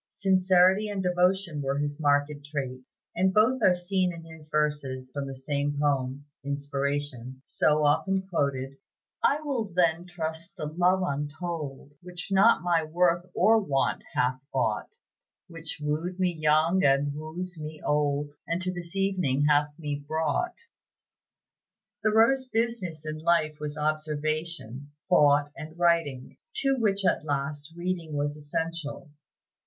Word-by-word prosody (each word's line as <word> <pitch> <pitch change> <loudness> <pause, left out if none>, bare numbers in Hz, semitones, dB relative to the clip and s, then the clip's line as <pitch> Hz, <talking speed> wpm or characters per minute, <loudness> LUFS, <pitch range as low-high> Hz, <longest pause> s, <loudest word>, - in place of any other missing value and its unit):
Sincerity 190 +1 +3
and 200 -2 -2
devotion 180 -3 +1
were 135 0 -1
his 145 +1 -2
most - - -7
marked 145 0 +3
traits; 130 -3 -6 0.2
and 185 +2 +3
both 225 +6 +3
are 185 -4 +5
seen 180 +1 0
in 170 -1 -9
his 160 -2 -13
verses 145 -4 -1
from 140 0 -4
the 135 - -6
same 145 +2 -2
poem 140 -1 0 0.2
("Inspiration") 140 -2 -3
so 155 0 +2
often 190 +6 +2
quoted: 135 -6 -1 0.5
"I 290 +2 +3
will 275 -7 -1
then 175 -2 +1
trust 165 +1 -5
the 155 - -4
love 180 +4 +2
untold 145 -1 -4
Which 175 0 -7
not 195 +1 +5
my 170 -2 +2
worth 175 +2 +1
or 220 +4 +5
want 140 -10 0
hath 125 +1 +1
bought, 120 -5 0 0.6
Which 165 -2 -6
wooed 155 +5 -2
me 180 -1 +2
young 155 +3 +3
and 140 +1 +3
wooes 160 +4 -6
me 155 0 -7
old, 145 0 +1 0.2
And 170 +1 0
to 185 0 -1
this 175 0 -8
evening 185 -8 +1
hath 150 0 +3
me 145 -3 -4
brought." 160 - 0 1.5
Thoreau's 230 +5 +3
business 220 -9 -2
in 155 0 -4
life 155 -2 +2
was 150 0 -5
observation, 155 -3 -2 0.2
thought, 145 -4 +4
and 155 +2 -9
writing, 165 -7 +1 0.2
to 275 -9 +2
which 200 -3 +1 0.2
last, 145 +1 -3
reading 175 -3 -3
was 145 0 -1
essential. 150 0 -4
155 Hz, 140 wpm, -27 LUFS, 145-180 Hz, 1.5 s, are